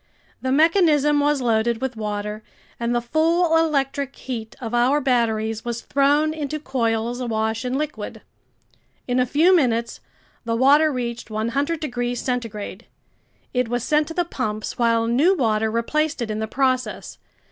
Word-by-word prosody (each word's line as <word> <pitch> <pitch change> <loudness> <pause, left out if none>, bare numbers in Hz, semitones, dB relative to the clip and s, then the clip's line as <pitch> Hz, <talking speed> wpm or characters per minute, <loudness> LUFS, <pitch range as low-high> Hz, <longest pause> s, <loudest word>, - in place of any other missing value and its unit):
The 260 - -1
mechanism 300 -1 +4
was 290 -1 +2
loaded 230 -1 +1
with 260 -1 -3
water, 210 0 -4 0.4
and 235 +1 -1
the 240 - 0
full 325 +5 +2
electric 280 -4 0
heat 230 -3 -6
of 230 -2 -6
our 250 +5 +3
batteries 225 -4 0
was 235 -1 -4
thrown 290 +3 +2
into 305 -1 -4
coils 235 -3 -1
awash 220 -1 -1
in 250 +1 -1
liquid. 300 0 -5 0.9
In 250 0 +1
a 250 - +2
few 330 +8 +4
minutes 235 -7 +1 0.4
the 230 -1 -1
water 290 +5 +5
reached 235 -3 -4
100 265 +9 -1
degrees 245 -5 -3
centigrade. 230 -4 -4 0.7
It 250 -1 +1
was 245 -1 -1
sent 300 +2 +2
to 325 - -7
the 350 - +1
pumps 215 -9 -4
while 230 -1 +2
new 280 +12 +3
water 220 -4 +1
replaced 290 +8 -1
it 220 - -4
in 215 - -3
the 220 - -2
process. 255 +1 -1
250 Hz, 155 wpm, -22 LUFS, 230-295 Hz, 0.9 s, water